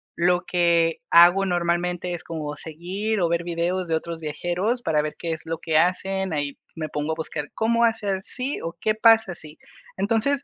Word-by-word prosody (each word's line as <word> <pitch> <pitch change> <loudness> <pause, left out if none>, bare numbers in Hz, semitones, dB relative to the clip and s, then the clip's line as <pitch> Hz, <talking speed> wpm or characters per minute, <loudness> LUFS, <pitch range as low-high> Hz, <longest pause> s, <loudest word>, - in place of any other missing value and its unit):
lo 175 +1 +2
que 170 -2 +2
hago 175 +3 +7
normalmente 175 0 -1
es 170 - -6
como 150 -3 -5
seguir 185 +8 -3
o 170 - +2
ver 170 0 0
videos 175 +2 -1
de 165 - +1
otros 165 +1 -4
viajeros 175 - -2
para 160 -7 +1
ver 150 0 -4
qué 165 - -3
es 160 -1 -4
lo 165 0 -3
que 160 -2 0
hacen, 190 +2 +1
ahí 145 -2 -2 0.2
me 155 -2 -4
pongo 150 +1 -2
a - - -4
buscar 155 -2 -5
cómo 235 +1 +2
hacer 210 -4 0
si 255 +7 -3
o 165 +1 -5
qué 215 - +2
pasa 225 -3 +5
si. 155 -1 -10 0.4
Entonces, 230 +8 +1
175 Hz, 190 wpm, -24 LUFS, 160-195 Hz, 0.4 s, hago